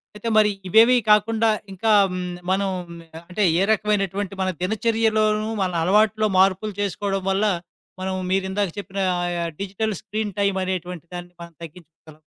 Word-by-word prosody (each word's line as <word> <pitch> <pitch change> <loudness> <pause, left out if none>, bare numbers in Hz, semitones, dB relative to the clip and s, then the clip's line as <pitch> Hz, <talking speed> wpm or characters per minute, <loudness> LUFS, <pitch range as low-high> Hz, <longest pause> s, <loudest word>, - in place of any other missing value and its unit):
అయితే 220 +2 -4
మరీ 210 -1 +5 0.2
ఇవేవీ 225 +6 +6
కాకుండా, 220 +2 +4 0.2
ఇంకా 215 +4 0 0.2
హ్మ్, 180 -1 -4 0.2
మనం 195 +1 +1 0.6
అంటే, 205 +3 -1 0.2
ఏ - - +2
రకమైనటువంటి 200 -2 0
మన 185 - +1
దినచర్యలోనూ, 215 +1 +1
మన 185 -1 0
అలవాట్లో 215 +3 +3
మార్పులు 195 +2 +2
చేసుకోడం 195 0 -2
వల్లా, 205 +2 +2 0.5
మనం 190 0 -2 0.2
మీరిందాక 190 0 0
చెప్పినా 195 0 -4 0.2
ఆయా 175 -1 -2 0.2
డిజిటల్ 200 +2 -2
స్క్రీన్ 210 -2 -4
టైమ్ 200 -1 +1
అనేటువంటి 180 -2 -4
దాన్ని 175 0 -8
మనం 170 0 -10
తగ్గించుకోగలం. 160 -1 -14
195 Hz, 135 wpm, -22 LUFS, 185-215 Hz, 0.6 s, ఇవేవీ